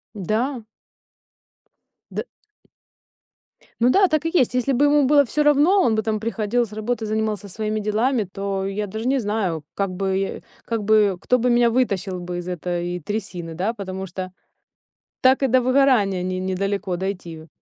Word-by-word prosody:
Да. 225 +5 -2 1.5
Д - - -4 1.6
Ну 245 - +5
да, 390 +8 +5
так 310 -2 0
и - - +1
есть. 260 -10 +3
Если 250 +2 +1
бы 270 +3 +3
ему 290 -1 +4
было 285 +1 +5
всё 300 +5 0
равно, 295 +7 +4
он 225 -9 +2
бы 220 - +1
там 220 -1 -1
приходил 230 +1 0
с 215 - -16
работы 220 +2 -2
и - - -3
занимался 215 -1 -2
своими 215 +2 -2
делами, 220 +4 +1
то 195 0 -4
я 205 +1 -3
даже 220 +4 -5
не 270 +1 +2
знаю, 205 - -2
как 200 -1 -1
бы 190 +1 -2 0.2
как 230 -2 -2
бы 205 -2 +3
кто 250 - +2
бы 250 +2 +1
меня 240 0 +4
вытащил 200 -7 -1
из 175 0 -5
этой 175 0 -3
трясины, 180 -3 -5
да, 190 +7 -1
потому 190 -3 -6
что 185 0 -6 0.9
так 260 +1 +4
и - - +4
до 255 +1 +3
выгорания 250 -8 +3
не 185 0 -2
недалеко 190 +1 -2
дойти. 175 -4 -5
215 Hz, 165 wpm, -22 LUFS, 190-250 Hz, 1.6 s, Ну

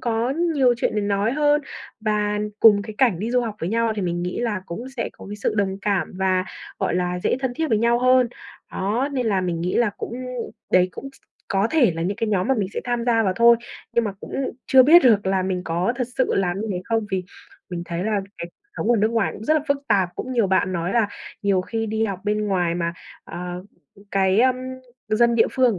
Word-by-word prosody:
có 235 +1 0
nhiều 285 -6 +2
chuyện 230 - -1
để 210 - +1
nói 205 +3 0
hơn 295 0 +3 0.4
và 210 -1 0 0.2
cùng 205 -3 +7
cái 215 0 -8
cảnh 230 -10 +3
đi 220 +4 -3
du 250 0 +3
học 225 -3 -3
với 165 - -2
nhau 230 +1 +1
thì 200 - -2
mình 175 -1 -2
nghĩ 180 +6 -3
là 210 -6 -2
cũng 230 +10 -6
sẽ 230 - -2
có - - -13
cái 205 - -6
sự 210 - -1
đồng 195 -1 0
cảm 195 -6 0
và, 185 -1 +1 0.3
gọi - - 0
là, 180 0 -1
dễ - - +1
thân 255 -2 -2
thiết 320 +1 -1
với 215 - +2
nhau 235 +1 +3
hơn. 255 0 +4 0.4
Đó, 225 +9 -1
nên 255 -4 -1
là 195 -3 +2
mình 175 -2 -2
nghĩ 180 +2 -2
là 235 -3 +3
cũng - - -5 0.6
đấy 180 0 +5
cũng 275 - -8
s - - -21 0.3
có 195 +2 +2
thể 260 - +4
là 165 - -2
những 195 +3 -1
cái 225 -1 -1
nhóm 200 0 0
mà 265 - +4
mình 205 -6 -1
sẽ - - -2
tham 240 -1 -1
gia 230 -2 +3
vào 190 -3 +1
thôi 235 0 +7 0.4
nhưng 235 - +2
mà 205 - -2
cũng - - -10 0.3
chưa 260 -1 +7
biết 325 +7 +7
được 210 -6 +4
là 190 -1 +1
mình 185 -1 -2
có 175 +7 0
thực 250 -2 -2
sự 260 - +2
làm 190 0 0
như 220 - -3
thế 180 -1 -4
không, 225 -2 -1
vì 185 -1 -1 0.5
mình 175 -1 -4
thấy 170 +1 -4
là 210 -2 0 0.2
cái 170 - -4
cuộc - - -59 0.3
sống 225 - 0
ở 240 - +4
nước 215 +1 +2
ngoài 225 -2 0
cũng 215 - -9
rất 310 - +3
là 310 - +3
phức 280 - +3
tạp, 195 -4 +3
cũng 255 - -5
nhiều 235 -5 +2
bạn 185 -1 +1
nói 175 +1 -2
là 230 -3 +2 0.3
nhiều 200 -2 +2
khi 225 +4 -3
đi 220 +1 0
học 195 -4 -3
bên 210 0 0
ngoài 180 -4 0
mà, 170 -1 -1 0.3
à, 180 0 -6 0.6
cái, 190 +1 +3
ưm, 255 0 +3 0.5
dân 235 +2 +3
địa 225 - +4
phương 250 -6 +2
210 Hz, 245 wpm, -22 LUFS, 190-235 Hz, 0.6 s, cùng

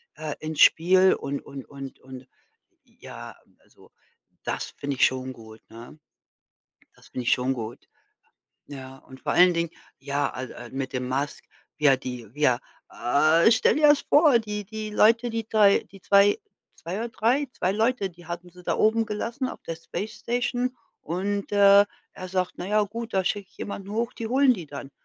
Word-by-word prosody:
äh, 155 -2 -5
ins 155 -1 -5
Spiel 185 +3 +6
und 140 0 -4
und 135 -2 -9
und 135 -1 -9
und 130 0 -12 0.6
ja, - - -11 0.3
also, - - -22 0.5
das - - -4
finde 140 -1 -3
ich - - +6
schon 130 0 -2
gut, 110 -2 -14
ne? 115 +6 -12 1.0
Das - - -20
finde 125 - -5
ich - - +3
schon 130 +1 0
gut, 115 -1 -7 0.8
ja. 135 -2 -9
Und 130 0 -15
vor - - -1
allen 180 0 +6
Dingen, 170 -1 -1 0.3
ja, 140 +1 -1
al 130 0 -7
al - - -10
mit 135 0 -4
dem 125 0 -2
Musk, 140 +3 -3 0.3
ja, 145 -3 +5
die 125 -3 -7
ja, 145 -5 +2 0.3
äh, 155 - +3
stell 230 +4 +3
dir 300 -1 +5
das 295 -1 +5
vor, 290 -4 +5
die 210 -1 -5
die 215 +1 -6
Leute, 230 +3 +4
die 225 -1 -3
2, 205 -2 +5
die 195 - -14
2, 200 +2 +4 0.4
2 170 +3 -6
oder 235 - -3
3, 235 +7 +1
2 185 - -1
Leute, 220 -1 +1
die 175 -1 -17
hatten 175 +1 -6
sie 180 +1 -16
da - - 0
oben 225 +1 +3
gelassen 235 +5 -3
auf - - -9
der 165 - -5
Space 200 +6 -6
Station 245 +1 -1 0.3
und, 200 +4 -3
äh, 200 0 +7 0.3
er 185 - -8
sagt: 185 0 -1
„Na 175 - -6
ja, 210 +2 +2
gut, 225 +3 -6
da 190 - +3
schicke 200 0 -2
ich - - -28
jemanden 200 -1 -6
hoch, 230 +3 -2
die 225 - -5
holen 265 +2 +4
die 175 -7 -8
dann.“ 140 -1 -8
185 Hz, 185 wpm, -25 LUFS, 140-220 Hz, 1.0 s, äh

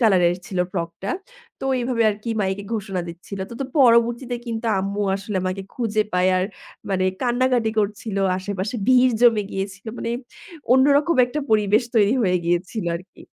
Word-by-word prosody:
কালারের 180 -6 +4
ছিল 185 - -4
ফ্রকটা। 170 +2 -4 0.5
তো - - -5 0.2
এভাবে 240 -1 0
আরকি 210 +3 -5
মাইকে 195 +1 -1
ঘোষণা 195 -4 -3
দিচ্ছিল। 175 +4 -8
তো, 235 - -7
তো 275 - 0
পরবর্তীতে 240 0 +4
কিন্তু 230 0 -3
আম্মু 200 +2 -2
আসলে 200 +1 -5
আমাকে 185 +1 -2
খুঁজে 220 -3 0
পায়। 180 +1 +3
আর 185 - +1 0.5
মানে 185 -1 +1 0.2
কান্নাকাটি 245 -2 +2
করছিলো 205 -1 -1 0.2
আশেপাশে 195 +3 -4
ভিড় 255 -1 +5
জমে 230 -4 +5
গিয়েছিলো 195 +1 -5
মানে 230 - -3 0.6
অন্যরকম 285 +5 +4
একটা 295 +5 -3
পরিবেশ 215 +1 +3
তৈরি 215 +1 +4
হয়ে 180 -3 +2
গিয়েছিল 175 +4 -1
আরকি। 180 +2 -14
210 Hz, 150 wpm, -22 LUFS, 190-240 Hz, 0.6 s, ভিড়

